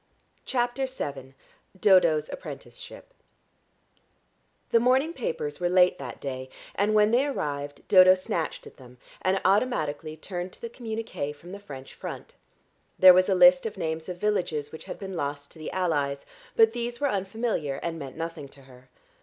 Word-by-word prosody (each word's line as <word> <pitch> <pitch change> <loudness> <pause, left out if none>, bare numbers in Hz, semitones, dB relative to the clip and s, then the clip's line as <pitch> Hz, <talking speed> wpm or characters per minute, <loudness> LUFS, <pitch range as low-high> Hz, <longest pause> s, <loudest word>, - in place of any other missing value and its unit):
CHAPTER 250 +1 0
VII 135 - -6 0.4
DODO'S 170 -6 +4
APPRENTICESHIP - - -10 1.6
The 230 - +5
morning 260 +7 +2
papers 470 +1 -4
were 175 - 0
late 180 0 +4
that 125 -4 -7
day, 130 -1 -5 0.2
and 210 +2 +1
when 210 0 +5
they 255 +4 +3
arrived 145 - -4
Dodo 185 -1 +8
snatched 180 -3 -3
at - - -13
them 125 -1 -15 0.2
and 190 +1 +1
automatically 160 - 0
turned 180 +2 -6
to - - -12
the 235 - -6
communiqué 220 - -5
from 170 +5 -13
the 200 - -7
French 135 -9 -10
front. - - -8 0.6
There 185 -1 +10
was 185 +1 +3
a 190 - +3
list 180 +2 +6
of 210 - -8
names 160 -1 -3
of 180 - -5
villages 175 -8 -1
which 160 - -10
had - - -7
been 190 -2 -7
lost 145 -2 -4
to 160 - -15
the 155 - -5
allies, 145 -7 -1 0.3
but 225 0 +5
these 240 0 -4
were 285 - +1
unfamiliar 195 - -2
and 165 -1 -3
meant 135 -1 -8
nothing 165 -3 -5
to 135 0 -17
her. 130 -1 -18
180 Hz, 165 wpm, -27 LUFS, 145-220 Hz, 1.6 s, There